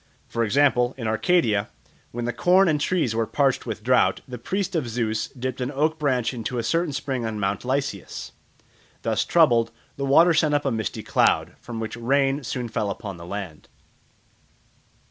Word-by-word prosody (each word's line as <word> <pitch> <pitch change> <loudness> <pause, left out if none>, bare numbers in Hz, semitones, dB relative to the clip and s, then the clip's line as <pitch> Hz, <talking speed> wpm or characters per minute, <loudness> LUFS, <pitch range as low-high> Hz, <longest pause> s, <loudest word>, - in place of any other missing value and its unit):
For 115 - -1
example, 125 +1 +2
in 115 -4 -4
Arcadia, 110 - +2 0.4
when 120 0 -4
the 120 - -1
corn 180 - +4
and 150 -3 +1
trees 160 -9 +1
were 115 0 0
parched 135 +3 +1
with 110 -2 -5
drought, 125 +2 +3
the 125 -2 -7
priest 195 - -2
of 145 -7 -1
Zeus 110 -2 -1
dipped 130 -1 -5
an 125 - -1
oak 155 +3 0
branch 130 -5 +1
into 120 +1 -4
a 115 - -1
certain 165 +2 0
spring 135 -2 -3
on 110 -2 -3
Mount 100 0 -1
Lycaeus. 130 -6 -3 0.7
Thus - - +1
troubled, 120 -9 +4 0.3
the 140 - -2
water 165 +5 +6
sent 150 -2 +2
up 145 - 0
a 135 - +1
misty 110 -3 -3
cloud, - - +2
from 115 -2 -7
which 110 0 -4
rain 135 +4 +1
soon 125 0 -3
fell 110 -2 -2
upon 100 -2 -6
the 85 0 -10
land. 95 -6 -6
125 Hz, 180 wpm, -24 LUFS, 110-145 Hz, 0.7 s, water